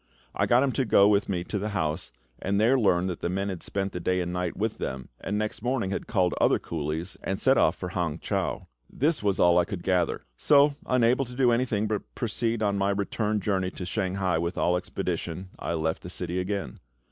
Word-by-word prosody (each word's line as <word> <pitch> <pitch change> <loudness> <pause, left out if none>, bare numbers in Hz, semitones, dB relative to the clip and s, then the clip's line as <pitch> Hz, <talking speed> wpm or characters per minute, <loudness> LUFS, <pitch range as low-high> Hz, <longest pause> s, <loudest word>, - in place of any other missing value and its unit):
I - - +1
got 125 +2 +5
him 140 - +1
to 135 - 0
go 100 -4 +5
with 105 -1 +2
me 90 -3 -1
to 105 - -3
the 105 +2 -2
house, 75 -7 -2 0.3
and 100 +2 0
there 115 +5 +4
learned 95 -7 +3
that 85 - -6
the - - -1
man 95 +2 -1
had 95 -3 -5
spent 100 0 -3
the 90 - -4
day 90 +1 0
and 90 0 -2
night 90 -1 -2
with - - -2
them, 65 -1 -4
and 105 - -2
next 105 0 -2
morning 120 -5 -1
had - - -3
called 90 -5 +2
other - - +4
coolies, 80 +3 -4
and 95 +1 -2
set 135 0 +4
off - - +3
for 90 - -5
Hang 85 -4 -2
chau. - - -2 0.2
This 150 +3 0
was 100 -2 0
all 85 0 +5
I 85 - +3
could 95 -3 -6
gather; 90 -3 +1
so, 145 - +5
unable 125 +1 +3
to 125 0 -10
do 125 -2 +4
anything 115 -3 +1
but 105 -2 -4
proceed 115 0 -1
on 100 -1 +1
my 100 +1 +2
return 105 +2 0
journey 95 -2 0
to 95 - -7
Shanghai 95 -2 0
with 85 +2 -2
all 90 - +2
expedition, 90 0 -3
I - - -2
left 80 0 -1
the 90 - -8
city 90 0 -3
again. 100 +2 -3
95 Hz, 225 wpm, -27 LUFS, 90-110 Hz, 0.3 s, got